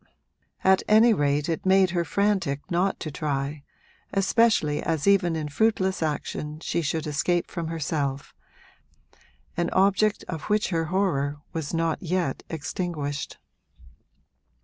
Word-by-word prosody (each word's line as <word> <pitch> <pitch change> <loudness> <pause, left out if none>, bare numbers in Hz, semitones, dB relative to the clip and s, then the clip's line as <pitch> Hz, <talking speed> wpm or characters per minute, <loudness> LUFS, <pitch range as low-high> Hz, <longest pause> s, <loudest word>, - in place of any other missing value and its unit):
At 190 0 +5
any 220 +2 +6
rate 145 -4 +1
it 165 -2 -2
made 190 -1 +4
her 175 -1 0
frantic 190 -8 0
not 180 +3 +1
to 155 - -4
try, 145 0 -3 0.5
especially 195 -7 +2
as 160 -3 -1
even 195 -4 +3
in 155 -2 -3
fruitless 190 +3 +1
action 150 0 -3
she 170 - -1
should 160 +1 -2
escape 170 +4 0
from 170 -1 -4
herself 145 -4 -3 1.2
an 175 0 0
object 200 +2 +3
of 160 -3 -5
which 210 0 +2
her 165 -3 0
horror 155 -6 0 0.2
was 160 -3 -3
not 165 -1 0
yet 175 -5 -1
extinguished. 150 -2 -4
165 Hz, 125 wpm, -25 LUFS, 150-190 Hz, 1.2 s, any